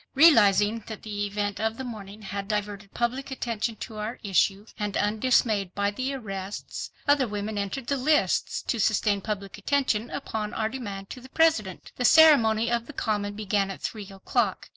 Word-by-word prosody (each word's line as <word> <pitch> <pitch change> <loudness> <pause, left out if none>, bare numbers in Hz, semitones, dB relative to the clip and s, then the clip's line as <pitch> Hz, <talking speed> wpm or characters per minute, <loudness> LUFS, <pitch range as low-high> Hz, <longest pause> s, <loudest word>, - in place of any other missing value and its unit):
Realizing 225 - +5
that 220 -2 -8
the 205 -1 -3
event 205 0 -3
of 220 +1 -1
the 265 - -5
morning 215 -3 -8
had 195 0 -5
diverted 205 -1 -3
public 250 +4 -1
attention 235 -4 -3
to 220 - -7
our 215 +3 -4
issue, 195 +1 +1
and 210 -1 -2
undismayed 210 -3 +1
by 200 0 +1
the 260 +6 -3
arrests, 195 -5 -6 0.2
other 285 -3 +4
women 210 0 -4
entered 200 +5 -3
the 280 +3 0
lists 300 +4 +1
to 235 - -2
sustain 205 -1 +2
public 200 -1 -5
attention 245 -2 0
upon 220 -6 -4
our 220 -1 0
demand 200 -6 -6
to 250 - -8
the 260 - -13
President. 255 - +1
The 250 - 0
ceremony 235 -8 +6
on 235 -1 0
the 295 - -10
Common 205 -4 -2
began 205 -1 0
at 195 - -7
three 210 -3 -5
o'clock. 195 +2 -1
215 Hz, 175 wpm, -26 LUFS, 205-240 Hz, 0.2 s, ceremony